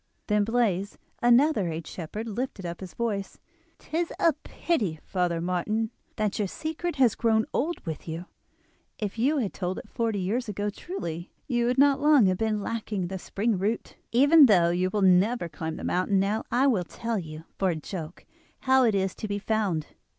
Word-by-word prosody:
Then 210 -1 +2
Blaize, 210 -4 0 0.2
another 240 - +4
aged 160 0 -4
shepherd, 210 +7 -6
lifted 225 -3 -4
up 170 0 -5
his 185 -2 -9
voice. 205 -5 -3 0.4
"'Tis 330 +2 -3
a 330 - +4
pity, 225 - -2
Father 180 -3 -1
Martin, 185 +6 -1 0.2
that 210 -1 -1
your 205 - +1
secret 320 - -4
has 255 -6 +4
grown 220 -1 +2
old 330 0 -1
with 160 -1 -5
you. 165 +2 -5 0.7
If 210 0 -4
you 285 +6 +2
had 225 -8 -1
told 185 0 -3
it - - -8
forty 230 -3 -1
years 215 +6 -1
ago 205 +1 -2
truly 175 - -6 0.2
you 240 -2 +1
would 250 +1 +1
not 280 0 +5
long 295 -6 +6
have 185 -1 +1
been 215 -2 0
lacking 210 -5 -3
the 190 0 -4
spring 205 +2 -1
root. 215 +4 -2 0.2
Even 285 +5 +7
though 175 -6 +5
you 180 +1 +1
will 205 +1 0
never 190 +2 +4
climb 160 -1 -5
the - - -8
mountain 185 +2 +1
now, 205 +3 0
I 255 +3 +3
will 225 -10 +3
tell 230 +5 -3
you, 155 -2 -8 0.2
for 190 - +2
a 170 - 0
joke, 160 +1 -7 0.4
how 265 0 +4
it 220 -3 +2
is 190 -1 0
to 215 - -6
be 205 0 -2
found. 205 -7 0
210 Hz, 185 wpm, -27 LUFS, 180-240 Hz, 0.7 s, Even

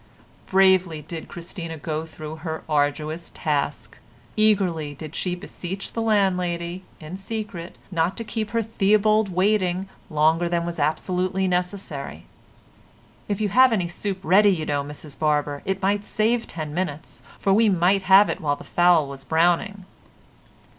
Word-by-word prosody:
Bravely 185 -5 +3
did 160 +1 -7
Christina 170 -1 -7
go 155 +1 -4
through 155 0 -8
her 160 -1 -5
arduous 150 +2 -1
task. 145 -1 -2 0.4
Eagerly 180 -9 +2
did 155 +2 -9
she 180 -1 -1
beseech 180 +1 -6
the 230 - -2
landlady, 180 -5 0 0.2
in 160 +3 -7
secret, 195 -4 -6 0.2
not 170 +1 0
to 230 - -3
keep 220 -1 -3
her 230 0 0
Theobald 215 0 +2
waiting 185 0 +1 0.2
longer 160 +3 +2
than 170 -1 0
was 170 -1 -5
absolutely 180 +5 0
necessary. 180 - -3 1.0
"If 205 -2 -2
you 210 -1 0
have 255 +5 +6
any 185 -6 0
soup 195 +2 -3
ready, 200 +4 +5
you 165 -5 0
know, 145 -1 -1
Mrs 145 0 -9
Barber, 150 -2 0
it 195 0 -2
might 200 +1 +1
save 225 +3 0
ten 155 -3 -6
minutes, 160 -4 -4 0.2
for 195 - +2
we 220 +2 +5
might 185 +1 +3
have 195 +2 +6
it - - -3
while 145 -2 +1
the - - -12
fowl 175 -4 +3
was 135 -1 -8
browning." 175 +4 +1
180 Hz, 150 wpm, -24 LUFS, 155-195 Hz, 1.0 s, have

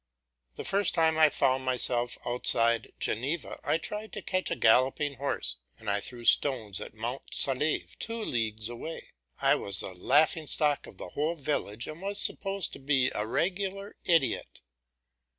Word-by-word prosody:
The - - -7
first 200 -1 +1
time 160 -1 +3
I 155 -1 +7
found 130 -1 +1
myself 125 -1 0
outside 115 -1 +2
Geneva 140 +10 -2
I - - +1
tried 210 +6 -6
to 210 - -6
catch 185 0 -1
a - - -1
galloping 130 +5 +3
horse, 135 - -2 0.2
and 110 - -11
I 100 - +1
threw 120 +2 -8
stones 110 -10 +4
at - - -8
Mont 120 +4 -3
Saleve, 140 +3 +1
two 230 0 -3
leagues 110 - -1
away; 120 +7 -7 0.3
I - - +4
was 100 -1 0
the 95 - -4
laughing 155 - +2
stock 145 -1 +2
of - - -14
the - - -6
whole 155 +4 -1
village, 130 -7 -2
and 155 +3 -8
was 200 +1 -2
supposed 195 -2 +1
to - - -9
be 135 -2 +2
a 105 +1 -2
regular 195 - -2
idiot. 165 -6 +1
140 Hz, 165 wpm, -29 LUFS, 120-165 Hz, 0.3 s, I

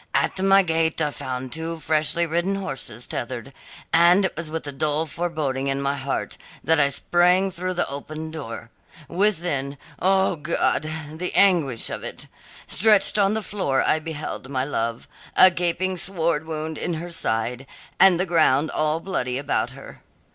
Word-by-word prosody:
At 185 - +1
my 195 0 +5
gate 160 -1 +1
I 150 - 0
found 130 -2 -5
two 165 +1 -4
freshly 155 +2 +1
ridden 170 +4 0
horses 135 - -4
tethered, 125 +2 -5 0.4
and 175 +3 +6
it 190 - -2
was 170 -2 -5
with 160 0 -4
a 145 - -4
dull 150 +3 -1
foreboding 155 -5 -2
in 135 0 0
my 140 0 0
heart 140 -1 -4 0.2
that 160 +2 +3
I 140 -1 +4
sprang 180 +6 +3
through 185 +1 -4
the 175 - 0
open 155 +3 -6
door. 115 -7 -7 0.4
Within 170 -7 -1 0.2
O 190 -1 +2
God, 155 0 0 0.2
the 175 +4 -4
anguish 165 - +3
of - - -5
it! - - -7 0.4
stretched 210 0 +3
on 200 +1 +3
the 220 - -2
floor 140 -12 0
I 155 - +2
beheld 155 -4 -6
my 130 -2 -1
love, 115 -3 -3 0.3
a 185 - +8
gaping 180 +2 -1
sword 165 -4 -1
wound 155 -1 -4
in 175 - -2
her 170 +2 -6
side, 125 -3 -2 0.3
and 180 -2 +7
the 185 - +2
ground 155 -4 +3
all 155 +1 0
bloody 125 -10 -2
about 140 +1 -1
her. - - -12
160 Hz, 165 wpm, -23 LUFS, 140-180 Hz, 0.4 s, a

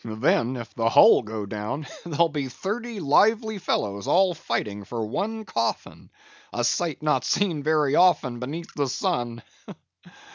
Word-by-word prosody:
Then, 115 +2 0
if 120 -2 -8
the 115 -1 +1
hull - - +7
go 110 -2 -5
down, 105 +8 -4 0.2
there'll 170 0 +2
be 145 -4 -4
thirty 215 - -5
lively 215 - +2
fellows 100 - -2
all 185 0 +4
fighting 105 -9 -3
for 115 +2 -4
one 220 - -3
coffin, 115 - -3 0.4
a 120 - -2
sight 155 +5 -1
not 155 - +1
seen 175 -7 0
very 150 -1 +2
often 145 -9 +3
beneath 155 +7 -6
the 140 -2 -1
sun! 120 -2 -2
140 Hz, 145 wpm, -25 LUFS, 115-175 Hz, 0.4 s, hull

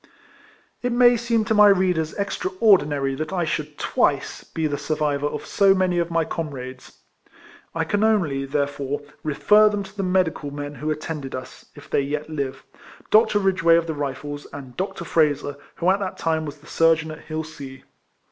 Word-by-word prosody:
It 245 - -1
may 240 0 +6
seem 230 -1 0
to 220 - +1
my 210 -1 +7
readers 180 -5 +2
extraordinary 195 - +2
that 155 +5 -4
I 180 -3 0
should - - -3
twice - - 0
be 160 - -4
the 145 -2 -1
survivor 150 -2 -1
of 150 - -5
so 195 -1 +4
many 185 -2 +1
of 170 0 0
my 165 -1 +1
comrades. 130 -6 -7 0.7
I 165 - +1
can 205 +6 0
only, 170 -12 +1
there 140 +1 +1
fore, 140 0 -4 0.2
refer 210 +8 +4
them 205 -1 -2
to 195 +1 -13
the 200 - -2
medical 180 -6 0
men 145 0 -6
who 150 +3 -4
at 155 0 -2
tended 150 -5 -5
us, 130 0 -9
if - - -13
they - - +1
yet 150 +3 -4
live, 140 -4 -4 0.5
Dr. 215 -1 +5
Eidgeway, 185 -4 +4
of 170 - 0
the 160 - -3
Rifles, 145 0 -5
and 135 -3 -9
Dr. 185 -2 -4
Frazer, 145 -3 +1 0.2
who 175 +2 +2
at 195 - +1
that 195 -2 -4
time 160 -1 -1
was 145 +1 -7
the 145 - -21
surgeon 165 0 +2
at 155 - -9
Hilsea. 155 -4 -7
160 Hz, 185 wpm, -23 LUFS, 145-190 Hz, 0.7 s, my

